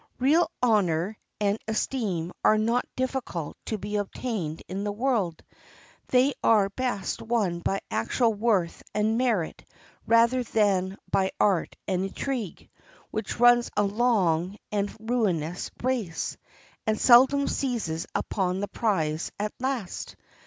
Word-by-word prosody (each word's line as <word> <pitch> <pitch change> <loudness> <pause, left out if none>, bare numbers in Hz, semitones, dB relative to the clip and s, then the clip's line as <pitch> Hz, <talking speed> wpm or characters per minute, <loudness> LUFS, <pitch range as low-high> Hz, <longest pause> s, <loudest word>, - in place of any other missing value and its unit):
Real 310 +7 +3
honor 200 -4 +2 0.2
and 205 +1 +1
esteem 215 -7 -1
are 215 - +5
not 230 +3 +1
difficult 255 - -3
to 220 - -2
be 210 +1 -3
obtained 200 -6 -3
in 195 +2 -4
the 205 - -1
world. 210 -7 -1 0.6
They 260 +2 +3
are 210 -3 +4
best 240 -3 -2
won 210 -7 0
by 195 +3 -1
actual 115 - +1
worth 205 -5 0
and 215 +1 +2
merit 225 -10 0 0.4
rather 230 +2 +4
than 200 -5 +1
by 190 -1 +2
art 195 -5 +2
and 185 0 0
intrigue, 230 0 -4 0.4
which - - -4
runs 240 0 +6
a 210 - +4
long 200 -5 +1
and 205 -1 0
ruinous 195 -8 -1
race, 235 -10 -1 0.5
and 215 0 +1
seldom 265 +3 +6
seizes 220 -12 -2
upon 185 -2 -1
the 205 - -2
prize 165 -9 -1
at 210 +1 -2
last. 255 -7 -3
210 Hz, 125 wpm, -27 LUFS, 185-240 Hz, 0.6 s, runs